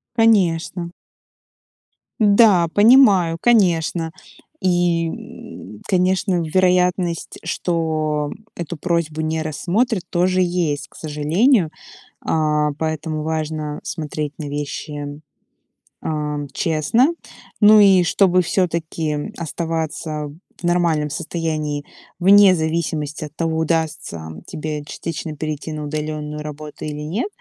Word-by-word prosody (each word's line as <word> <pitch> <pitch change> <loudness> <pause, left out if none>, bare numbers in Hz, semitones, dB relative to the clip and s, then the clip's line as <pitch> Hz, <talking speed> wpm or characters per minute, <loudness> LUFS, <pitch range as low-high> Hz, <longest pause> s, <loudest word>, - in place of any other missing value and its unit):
Конечно. 180 -6 +2 1.3
Да, 205 -4 +5
понимаю, 205 -7 +6
конечно. 170 -7 +2 0.5
И, 175 -2 +2
м, 105 -8 -10
конечно, 185 0 +1
вероятность, 180 0 +1
что 155 -3 -1 0.3
эту 170 -1 -5
просьбу 165 -2 -1
не 160 0 -1
рассмотрят, 185 - 0
тоже 185 +1 +2
есть, 175 -5 -1
к - - -23
сожалению. 160 - +2 0.5
А, 150 -1 +1
поэтому 155 -1 -2
важно 155 -1 -3
смотреть 150 -1 -4
на 155 - -4
вещи, 145 0 -5 0.8
а, 150 -1 -2 0.2
честно. 165 - +2 0.5
Ну 215 +1 +8
и 195 -3 +6
чтобы 185 +1 +3
всё-таки 165 -1 -2
оставаться 160 -2 -3 0.3
в - - -19
нормальном 170 -4 +1
состоянии 155 -1 -3 0.4
вне 195 +1 +7
зависимости 160 -2 -2
от 150 - -12
того, 165 -1 -1
удастся 160 - -2 0.2
тебе 150 -1 -5
частично 160 0 -5
перейти 155 +1 -4
на 150 - -5
удаленную 150 0 -4
работу 150 0 -8
или 150 -1 -5
нет, 175 - -2
160 Hz, 100 wpm, -20 LUFS, 150-180 Hz, 1.3 s, Ну